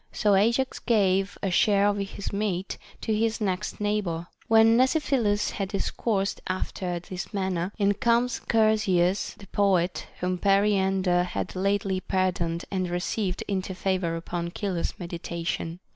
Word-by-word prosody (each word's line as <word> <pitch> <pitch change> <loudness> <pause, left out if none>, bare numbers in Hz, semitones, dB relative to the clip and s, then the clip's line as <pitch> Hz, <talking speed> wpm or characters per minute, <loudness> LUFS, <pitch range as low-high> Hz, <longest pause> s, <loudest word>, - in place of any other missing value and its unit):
So 205 -1 +2
Ajax 235 +7 +2
gave 195 -3 +2
a 195 - 0
share 200 +2 +4
of 205 0 +3
his 200 0 -5
meat 200 -2 -2 0.2
to 220 - -1
his 225 +1 0
next 190 -4 -2
neighbor. 205 -5 -1 0.2
When 225 0 +6
Mnesiphilus 255 -5 +2
had 195 -2 -3
discoursed 200 0 -1
after 185 -1 -3
this 180 +1 -7
manner, 190 -2 -1
in 205 -2 +3
comes 235 +2 +1
Chersias 210 -5 +2
the 200 - -12
poet, 185 -2 +1
whom 180 0 -1
Periander 195 -2 +3
had 180 - -3
lately 195 0 0
par 185 0 +1
doned 170 -1 -3
and 185 -2 -1
received 180 +2 -2
into 190 -1 -2
favor 185 -3 -1
upon 170 +1 -4
Chilo's 190 -5 -2
mediation. 170 -1 -4
195 Hz, 140 wpm, -26 LUFS, 180-210 Hz, 0.2 s, When